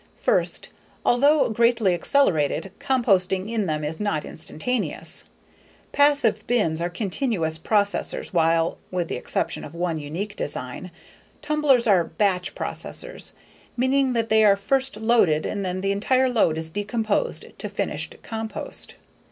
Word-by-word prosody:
First, - - 0 0.4
although 285 +5 +4
greatly 230 -3 +3
accelerated, 175 - +1
composting 200 -9 +2
in 220 -3 -1
them 155 -1 -2
is 150 +2 -4
not 205 -8 -1
instantaneous. 225 +9 -3 0.7
Passive 285 -7 +3
bins 185 -10 +1
are 175 - 0
continuous 180 - -1
processors 205 +3 0
while 165 -1 +2
(with 180 -2 -2
the - - -2
exception - - -2
of 150 - -9
one 170 -2 -1
unique 175 +8 -5
design) 145 +3 -5 0.5
tumblers 295 -5 +3
are 195 -6 +4
"batch" 180 +2 -1
processors, - - -4 0.4
meaning 260 +1 +2
that 230 -1 0
they 220 0 +5
are 200 -2 +6
first 265 +3 0
loaded 220 -9 +3
and 200 -1 -3
then 185 0 -3
the 195 +1 0
entire 255 +6 +2
load 215 -10 +2
is 160 0 -4
decomposed 205 +2 -1
to - - -4
finished - - -3
compost. 220 -1 -3
205 Hz, 135 wpm, -24 LUFS, 170-240 Hz, 0.7 s, are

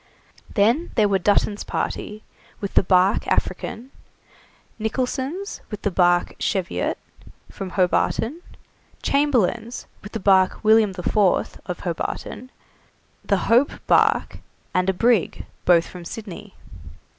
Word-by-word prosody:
Then 235 +11 +2
there 215 -3 +4
were 195 -1 +1
Dutton's 205 +2 +1
party, 210 +1 -4 0.4
with 200 - -5
the - - +5
barque 185 +1 +3
'African'; 250 +4 -2 0.9
Nicholson's, 260 - -3
with 210 - -7
the 205 - 0
barque 175 -1 +2
'Cheviot', 190 -2 -1 0.5
from 195 -1 -6
Hobarton; 225 - +1 0.6
Chamberlain's, 245 -5 +1 0.2
with 205 - -11
the 225 - -3
barque 190 -2 +3
'William 215 -2 +4
the 180 -1 -7
Fourth', 200 -1 +1
of 180 - -5
Hobarton; 185 +7 -4 0.7
the - - +1
'Hope' 245 +5 +3
barque, - - +2 0.3
and 185 +1 +1
a - - +2
brig, 230 0 +1 0.2
both 170 -2 +5
from 180 -1 -10
Sydney. 205 +1 -9
205 Hz, 120 wpm, -22 LUFS, 185-235 Hz, 0.9 s, the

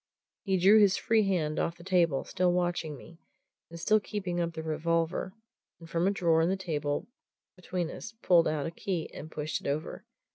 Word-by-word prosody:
He 190 -2 0
drew 195 +4 +6
his 200 -3 +5
free 220 -3 +2
hand 160 -5 0
off 165 - -1
the 170 - -13
table, 170 -6 +2
still 180 -1 +1
watching 175 -4 -1
me, 165 +5 -14 0.5
and 170 0 -9
still 215 +5 +3
keeping 190 -4 -4
up 170 -1 -1
the 160 - -5
revolver, 165 +3 -1 0.4
and 165 - -12
from 170 +2 0
a - - +5
drawer 170 -5 +2
in 165 - +2
the 190 - 0
table 150 -3 -2 0.5
between 180 -2 -3
us 225 - -8
pulled 170 -2 +5
out 155 -2 -1
a 165 - -3
key 170 -1 -4
and 155 - -8
pushed 155 0 -3
it - - -6
over. 145 +2 -3
170 Hz, 195 wpm, -29 LUFS, 160-185 Hz, 0.5 s, drew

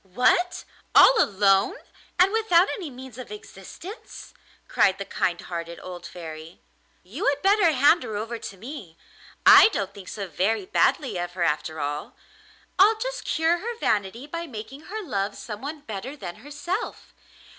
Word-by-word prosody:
'What! 355 +8 +2 0.3
all 480 -3 +8
alone, 195 0 +3 0.4
and 365 +2 +5
without 410 -5 +4
any 355 -7 -4
means 260 -1 -11
of 250 - -9
existence?' 210 - -10 0.3
cried 195 -1 +3
the 200 - -5
kind 175 -2 -1
hearted 170 -1 -6
old 175 -1 -8
Fairy. 160 -1 -9 0.4
'You 235 - -4
had 285 0 +1
better 390 -3 +5
hand 290 +4 +4
her 215 - -5
over 225 +2 -4
to 195 - -8
me. 210 - -9 0.5
I - - +10
don't 200 - -3
think 195 -2 -12
so 200 -2 -5
very 205 - 0
badly 270 - +1
of 175 0 -4
her 180 -1 -2
after 155 0 -1
all. 145 +1 -4 0.6
I'll 425 +3 +6
just - - -4
cure 330 +2 +1
her 465 +4 -5
vanity 215 - -1
by 335 +3 -5
making 255 +3 -8
her 435 +2 -4
love 200 - -2
someone 275 +8 -7
better 235 +2 -6
than 175 -9 -7
herself. 345 - -5
230 Hz, 155 wpm, -25 LUFS, -, 0.6 s, I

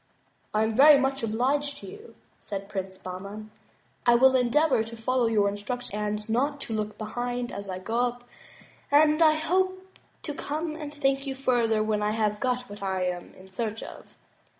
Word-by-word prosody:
"I 215 +1 +2
am 220 0 0
very 280 +4 +8
much 270 0 0
obliged 265 +6 0
to - - -10
you," 420 +4 -12 0.2
said 200 -1 -6
Prince 190 -2 -5
Bahman. 200 +4 -8 0.5
"I 240 - +5
will 260 +2 +6
endeavor 255 +1 +3
to 225 +1 -9
follow 250 +1 +1
your 210 -3 +3
instructions 210 +5 -4 0.3
and - - -20
not 275 +6 0
to 225 - -4
look 215 -1 -3
behind 245 +2 -3
as 200 0 -7
I 185 - -3
go 225 +5 -3
up 245 0 -1 0.7
and 300 +2 +5
I 310 -1 +6
hope 370 +3 -1 0.2
to 295 - -4
come 310 +2 -3
and 300 -2 -6
thank 275 -1 0
you 270 - -3
further 235 -5 +2
when 215 -1 0
I 210 0 +1
have 210 -1 0
got 250 -1 0
what 205 0 -10
I 190 -1 -1
am 180 -1 -4
in 190 0 -16
search 220 +2 -3
of." - - -12
240 Hz, 185 wpm, -27 LUFS, 210-280 Hz, 0.7 s, very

